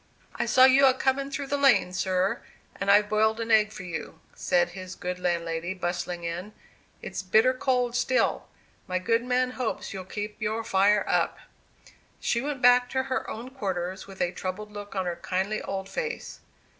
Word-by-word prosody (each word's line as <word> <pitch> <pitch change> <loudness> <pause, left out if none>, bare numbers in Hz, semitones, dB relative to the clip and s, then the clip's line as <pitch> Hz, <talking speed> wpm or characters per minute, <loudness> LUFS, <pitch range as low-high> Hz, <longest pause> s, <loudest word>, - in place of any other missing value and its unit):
"I - - -2
saw 255 - +7
you 270 +1 +6
a 260 - +4
comin' 270 +1 0
through 280 0 -4
the 285 +1 -1
lane, 265 -10 +4
sir, 185 0 0 0.3
and 200 - -3
I've 205 +1 +6
boiled 220 +1 +2
an 230 0 -2
egg 215 -1 +5
for 185 - -8
you," 165 -2 -6
said 175 -1 +1
his 185 +1 -8
good 180 -1 -4
landlady, 170 0 -2
bustling 175 -1 -3
in. 175 +5 -5 0.5
"It's - - -4
bitter 220 +7 +4
cold 255 -2 0
still. 255 +1 +1 0.4
My 185 - -1
good 230 +5 +1
man 250 0 +1
hopes 250 -5 -3
you'll 190 -1 -6
keep 210 +3 -6
your 220 +1 -1
fire 205 -1 +3
up." - - +1 0.8
She 235 - 0
went 280 -2 -4
back 245 0 +6
to 260 0 0
her 260 0 -3
own 240 +4 -7
quarters 190 -7 -4
with 195 -1 -9
a 175 - -1
troubled 190 +3 -5
look 205 -1 -8
on 190 -1 -1
her 175 -1 -3
kindly 190 +4 -2
old 190 0 -4
face. 465 - -5
210 Hz, 180 wpm, -27 LUFS, 185-250 Hz, 0.8 s, saw